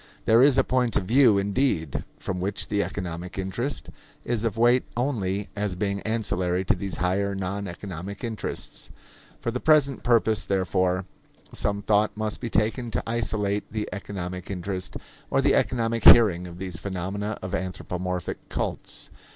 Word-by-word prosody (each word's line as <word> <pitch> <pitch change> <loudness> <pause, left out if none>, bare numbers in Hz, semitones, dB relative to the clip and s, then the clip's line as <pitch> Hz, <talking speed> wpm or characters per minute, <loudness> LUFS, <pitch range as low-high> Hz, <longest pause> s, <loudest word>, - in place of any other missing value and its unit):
There 115 +2 +6
is 135 0 +6
a 135 - +6
point 125 -3 +1
of - - 0
view, 115 +1 +5
indeed, 100 - 0
from 95 -2 -4
which 100 +3 -2
the 100 -1 +1
economic 90 -2 -5
interest 95 +9 -3 0.3
is 120 -2 0
of 115 -2 -1
weight 120 +2 +5
only 105 -7 -1
as 105 -2 -1
being 100 +1 -1
ancillary 95 -5 0
to - - +4
these 95 -2 -4
higher, 100 +3 0
non 100 +1 -3
economic 95 +2 -7
interests. 115 -2 -5 0.5
For 115 - -2
the 125 - -2
present 145 -3 +4
purpose, 115 -3 +3
therefore, 95 -1 +1 0.5
some 100 0 -1
thought 105 0 +2
must 110 -1 -2
be 120 - -3
taken 115 +3 0
to - - -2
isolate 105 -3 -1
the 105 -1 -2
economic 90 -2 -5
interest 95 0 -4 0.3
or - - +2
the - - +4
economic 115 -2 +1
hearing 95 -7 +8
of 85 0 -10
these 90 -2 -5
phenomena 100 +2 -3
of 95 - -5
anthropomorphic 90 -1 -3
cults. - - -4
100 Hz, 155 wpm, -26 LUFS, 95-115 Hz, 0.5 s, hearing